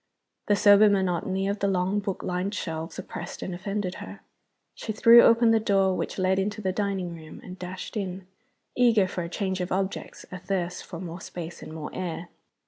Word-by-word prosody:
The 205 - +4
sober 205 +1 +7
monotony 190 0 0
of 200 +1 -1
the 200 - +1
long 190 +1 +1
book 195 -2 -4
lined 180 +3 -2
shelves 160 -3 -4
oppressed 175 -1 -7
and 185 - -4
offended 195 +1 -3
her. - - -9 0.5
She 220 - -5
threw 230 +2 +8
open 230 0 +5
the 225 - +4
door 195 -3 +2
which - - -3
led 190 0 +2
into 205 +2 -2
the 190 -3 -1
dining 190 -3 -2
room, 160 -2 -11
and 185 0 -10
dashed 180 +3 -7
in, 190 -2 -4 0.5
eager 230 -6 +4
for 185 - -4
a 170 - -5
change 190 0 -2
of 180 - -3
objects, 190 +1 -3
athirst 180 -1 -3
for 170 - -8
more 175 0 -7
space 175 -2 -7
and - - -9
more 155 -1 -6
air. 175 -1 -4
190 Hz, 190 wpm, -26 LUFS, 180-200 Hz, 0.5 s, threw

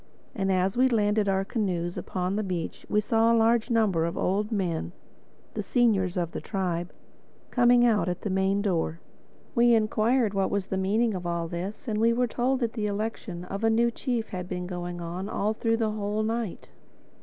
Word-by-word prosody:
And 195 -2 0
as 185 +1 +1
we 255 +2 +4
landed 210 -3 +2
our 195 0 +1
canoes 180 -6 -2
upon 185 +1 -2
the 215 - 0
beach 180 -5 -4
we 210 - +3
saw 225 +2 +3
a 230 - +4
large 230 +1 +3
number 210 -8 +2
of 170 - -3
old 205 +4 0
men, 175 -5 -2 0.6
the - - -2
seniors 200 -7 +2
of 170 -2 -1
the - - -5
tribe, 180 -3 -2 0.6
coming 245 0 +5
out 210 -6 +2
at 175 - -3
the 205 - -3
main 190 +1 +1
door. 170 -4 0 0.5
We 235 -1 +5
inquired 220 +1 +2
what 195 -1 +1
was 200 -2 -1
the - - -1
meaning 210 +4 +1
of 180 -2 -4
all 170 -1 -1
this; 180 +8 -6
and 215 -2 -1
were 230 +2 +3
told 250 +3 0
that 230 -2 0
the 215 -3 -1
election 205 -3 -4
of 195 +4 -5
a 225 - +4
new 235 +1 +3
chief 235 -2 -2
had 180 -1 -5
been 180 -1 -3
going 175 -1 -5
on 175 +4 -5
all 215 0 0
through 225 +1 0
the 220 -2 0
whole 210 0 -2
night. 225 -3 -3
205 Hz, 195 wpm, -27 LUFS, 180-225 Hz, 0.6 s, coming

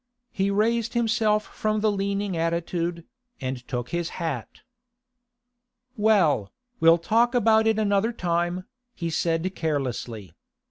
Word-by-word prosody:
He 195 +1 0
raised 230 +3 +1
himself 220 -2 +2
from 215 0 -2
the 215 0 +3
leaning 200 -1 -1
attitude, 170 0 -2 0.3
and 130 -1 -3
took 120 -2 -3
his 170 -1 -2
hat. 150 -9 -4 1.3
'Well, 195 - +3 0.3
we'll 165 +1 +6
talk 230 +8 +2
about 220 -1 +4
it 220 -1 +3
another 210 +1 +2
time,' 175 -2 -1 0.3
he 170 -2 -3
said 165 +3 0
carelessly. 125 - -3
185 Hz, 120 wpm, -25 LUFS, 165-215 Hz, 1.3 s, we'll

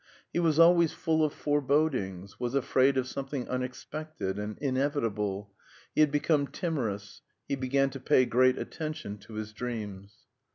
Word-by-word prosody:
He - - +1
was 160 -3 +2
always 170 -1 +6
full 160 -1 +1
of 155 - +2
forebodings, 140 - 0
was 125 +1 -2
afraid 135 0 +3
of 130 - +1
something 135 -1 -4
unexpected 130 -3 -4
and 105 0 -4
inevitable; 115 -8 -1 0.4
he - - +3
had 155 - +6
become 145 0 +2
timorous; 125 - -3 0.3
he - - -2
began 135 +1 +1
to 135 - -7
pay 130 0 +4
great 125 +2 +4
attention 155 -10 -5
to 105 +2 -12
his 110 0 -5
dreams. 105 -4 -6
130 Hz, 150 wpm, -29 LUFS, 105-150 Hz, 0.4 s, always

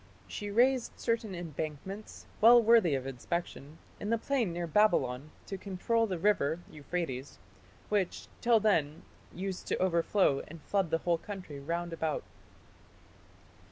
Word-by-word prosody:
She 205 - -5
raised 245 +4 +3
certain 225 -4 -1
embankments, 170 +4 -6 0.2
well 235 +2 +9
worthy 225 -9 +5
of 130 -1 -3
inspection, 145 +2 -4 0.2
in 205 - -4
the 230 - +3
plain 235 -4 0
near 170 +1 -3
Babylon, 150 -8 +2 0.2
to 195 - -6
control 225 +4 0
the 185 -3 -2
river 165 -4 +2
(Euphrates), 145 -3 -4 0.5
which, 200 -4 -1
till 235 -2 +5
then, 165 -8 +1 0.3
used 190 0 -5
to - - 0
overflow 170 -4 +2
and 165 +2 -10
flood 195 -4 0
the 165 - +2
whole 170 -1 +2
country 185 -8 -7
round 170 +4 -3
about." 160 -2 -2
180 Hz, 135 wpm, -31 LUFS, 155-210 Hz, 0.5 s, well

